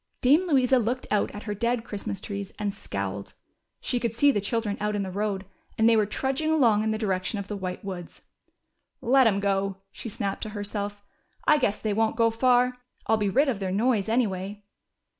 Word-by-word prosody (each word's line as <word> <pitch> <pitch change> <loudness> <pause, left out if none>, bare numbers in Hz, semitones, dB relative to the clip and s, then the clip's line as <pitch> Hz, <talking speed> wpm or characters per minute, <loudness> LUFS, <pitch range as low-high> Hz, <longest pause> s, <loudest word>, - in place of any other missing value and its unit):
Dame 300 +9 +4
Louisa 260 -4 +4
looked 245 +3 -1
out 210 -1 +2
at 205 - -8
her 210 - -3
dead 235 +2 0
Christmas 200 -3 -5
trees, 200 -1 -5
and 205 -1 -2
scowled. 100 - -5 0.5
She 245 - 0
could 235 -2 -1
see 285 +5 +5
the 205 - 0
children 210 0 -1
out 210 0 -1
in 205 - 0
the 190 - -5
road, 200 0 -2 0.3
and 220 - +4
they 230 - +6
were 215 -2 +3
trudging 270 +7 -1
along 235 -9 +4
in 220 - 0
the 220 - 0
direction 195 -1 -1
of 200 -1 -5
the 210 - -4
White 185 0 -5
Woods. 180 -3 -7 0.8
^^Let 260 +1 +5
'em 200 -3 +2
go," 195 -1 0
she 230 - -7
snapped 200 -1 -3
to 215 - -3
her 205 - -3
self. 205 0 -4 0.6
guess 210 -6 +1
they 215 -2 -1
won't 220 +1 +1
go 230 -1 +4
far. 250 +1 +3 0.3
I'll 220 - +3
be 205 -2 +1
rid 275 +9 +3
of 240 -7 0
their 190 -2 -2
noise, 220 0 +1
anyway." 205 -3 -1
210 Hz, 205 wpm, -26 LUFS, 200-240 Hz, 0.8 s, they